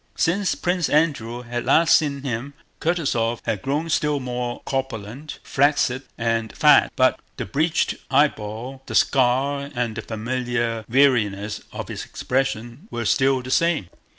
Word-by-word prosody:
Since 185 +4 +1
Prince 180 -1 0
Andrew 125 -6 +1
had 120 0 -4
last 165 0 +5
seen 140 -3 0
him 135 +2 -4 0.2
Kutúzov 135 -9 0
had 105 - -1
grown 145 +4 -1
still 150 -2 +1
more 125 -1 -4
corpulent, 130 +1 -4
flaccid, 135 -2 +2 0.2
and 115 -1 -1
fat. - - +6
But - - +3 0.2
the - - -3
bleached 155 - +1 0.2
eyeball, 130 -2 0
the - - -5
scar, 140 +2 +2
and 120 -2 -1
the 115 - -4
familiar 115 0 -2
weariness 110 -6 +2
of - - -6
his - - -5
expression 125 - -3
were 120 -1 -4
still 130 +4 +2
the 130 - -6
same. 165 - +2
130 Hz, 140 wpm, -23 LUFS, 115-145 Hz, 0.2 s, fat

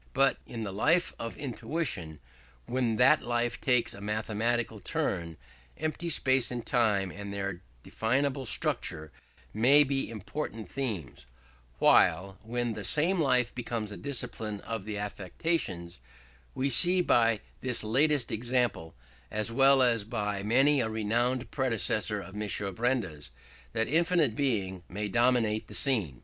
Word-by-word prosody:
But 135 0 +3
in 115 -2 -6
the 100 -3 -5
life 170 - +2
of 115 - -6
intuition, 115 - -3 0.5
when 125 -3 0
that 125 - +5
life 120 0 -1
takes 125 -2 +2
a 100 - -11
mathematical 110 +2 -1
turn, 85 -3 -3 0.4
empty 155 +2 -3
space 130 -5 +2
and 120 -2 -5
time 105 -7 +1
and 100 +3 -8
their 100 -3 -4 0.2
definable 130 +3 -1
structure 80 -6 -1 0.4
may 135 +7 +5
be 135 -1 -2
important 110 -1 -6
themes; 105 - -5 0.5
while, 95 +1 +3
when 120 +1 -2
the 105 - -6
same 170 - +3
life 125 -4 +2
becomes 115 -3 -4
a - - -6
discipline 115 -6 -3
of 110 -3 -5
the 105 -1 -4
affections, 100 - -3 0.6
we 130 - 0
see 175 +8 +4
by 115 -9 +3 0.2
this 125 -3 0
latest 135 +4 +2
example, 120 -7 -1 0.3
as 110 +1 -1
well 135 +2 +5
as 115 -4 +3
by 105 -2 -3
many 135 +7 +3
a 110 - -1
renowned 120 +4 -1
predecessor 110 -5 0
of 95 0 -10
M. 105 0 -3 0.2
Benda, 115 - -1 0.5
that 110 - 0
infinite 165 -6 +2
Being 100 -10 -1
may 105 +3 -3
dominate 115 -1 +1
the - - -7
scene. 105 - +2
115 Hz, 135 wpm, -29 LUFS, 105-130 Hz, 0.6 s, that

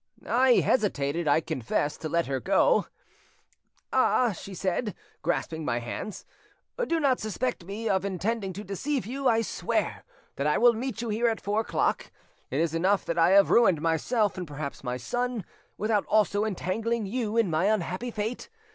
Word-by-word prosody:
I 255 +1 +4
hesitated, 170 - 0
I 145 +2 +4
confess, 145 -1 -1
to 155 - -5
let 170 +1 +1
her 135 0 -2
go. 200 - +3 1.1
'Ah,' 245 -3 +3
she 195 +1 -8
said, 195 +3 -1 0.3
grasping 160 -1 -2
my 120 -5 0
hands, 120 - -6 0.6
'do 335 - +1
not 275 -4 +2
suspect 220 -2 -3
me 210 +4 -4
of 190 -3 +1
intending 200 +2 -2
to 205 +4 -7
deceive 245 +7 -2
you! 270 +4 -2
I 225 -1 +4
swear - - -2 0.3
that 140 - 0
I 150 - +2
will 240 0 +6
meet 235 0 -4
you 235 - -3
here 225 +3 +1
at 225 -2 0
four 205 +3 -1
o'clock. - - -1 0.4
It 135 - -1
is 165 -1 +1
enough 190 +4 +2
that 170 - -1
I 165 - +5
have 200 0 +6
ruined 195 -9 +5
myself, 185 +6 0
and 180 - -5
perhaps 145 -1 -6
my 125 -1 -2
son, 245 - -2 0.3
without 215 -1 0
also 210 0 +2
entangling 220 +3 -1
you 225 +1 -2
in 220 -7 +3
my 160 +4 +1
unhappy 205 +2 0
fate. 220 +1 -4
200 Hz, 175 wpm, -27 LUFS, 165-230 Hz, 1.1 s, will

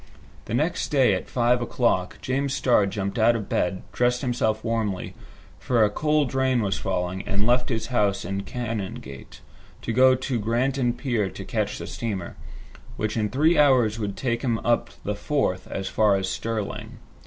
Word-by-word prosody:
The 110 - -3
next 155 +7 0
day, 135 -8 +4
at 95 - -3
five 120 0 +2
o'clock, 115 -6 0
James 135 +1 -1
Starr 120 -6 +3
jumped 100 +2 -3
out 115 +2 +5
of 105 -4 -4
bed, 95 +1 -1
dressed 125 0 +1
himself 110 -4 0
warmly, 110 -5 -2 0.5
for 120 -3 +2
a 105 - 0
cold 150 +1 +1
rain 130 -3 +2
was 100 -1 -1
falling, 90 0 -2
and 100 +1 0
left 125 +1 +2
his 115 -3 -1
house 100 -4 +1
in 95 +2 -3
the 100 - -3
Canongate, 100 - -6 0.4
to 115 - -2
go 130 +2 +6
to 130 -1 -2
Granton 120 +3 +1
Pier 120 -8 -1
to - - -8
catch - - -2
the - - -6
steamer, 100 -7 -4 0.6
which 110 0 -2
in 105 -2 0
three 155 +7 +3
hours 125 -7 +4
would 100 -2 -3
take 120 -2 -1
him 120 -4 0
up 120 0 +2
the 105 - -1
Forth 100 -4 -1
as 95 -1 -4
far 105 0 +3
as 95 -1 -1
Stirling. 105 +2 -4
115 Hz, 175 wpm, -25 LUFS, 100-125 Hz, 0.6 s, go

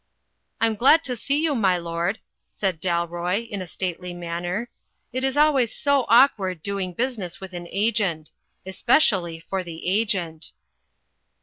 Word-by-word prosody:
"I - - +3
am 225 -1 +1
glad 305 +8 +5
to 255 -2 -1
see 275 +5 0
you, 315 -1 +1
my 195 -8 +2
lord," 170 +4 -2 0.3
said 185 -6 -2
Dalroy, 175 +4 -1
in 205 -3 -5
a 185 - -6
stately 180 0 -4
manner, 175 +6 -4 0.4
"it 255 +1 -2
is 270 +1 0
always 285 -6 +3
so 280 -3 +1
awkward 200 - +4
doing 195 -3 -3
busi 250 +1 -1
ness 180 -3 -6
with 190 -1 -9
an 175 -1 -6
Agent. 195 -7 0 0.3
Especially 190 - +2
for 190 +3 -4
the 170 -1 -7
Agent." 180 -5 -1
190 Hz, 150 wpm, -24 LUFS, 175-235 Hz, 0.4 s, glad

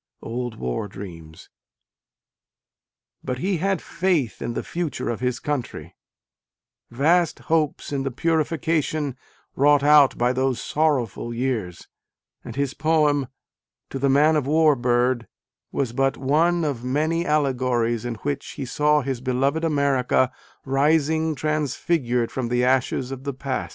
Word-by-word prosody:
(Old 120 0 -4
War 60 - -3
Dreams.) 85 -5 -11 1.7
But 125 - -3
he 185 +7 -1
had 195 +2 -1
faith 170 -8 -1
in 120 - -3
the - - -2
future 170 -7 -3
of 115 - -4
his 125 -1 -1
country, 145 -4 -4 0.9
vast 165 +7 +2 0.2
hopes 155 -3 0
in 140 - 0
the 135 - -1
purification 155 -1 0 0.4
wrought 145 +1 +4
out 145 -2 +6
by 120 +1 +2
those 130 -1 0
sorrowful 130 -6 -1
years: 115 -8 -3 0.6
and - - -8
his 140 -1 -1
poem 150 -4 +2 0.6
To 135 - -4
the 140 +1 +2
Man 150 +4 +4
of~War 150 +1 +3
Bird 120 -1 +1 0.4
was 130 -4 -2
but 135 +2 +1
one 165 +5 +2
of 135 -6 -3
many 155 +6 0
allegories 130 -7 0
in 120 -1 -3
which 140 -1 -3
he 140 - -5
saw 150 +4 +2
his 130 -3 -3
beloved 135 +5 0
America 140 -5 +2 0.3
rising 155 +3 +2
transfigured 145 -4 -1
from 130 -2 -2
the 125 0 +1
ashes 130 0 +1
of 135 -1 -6
the 140 -2 -4
past. 135 0 -3
135 Hz, 135 wpm, -23 LUFS, 125-155 Hz, 1.7 s, out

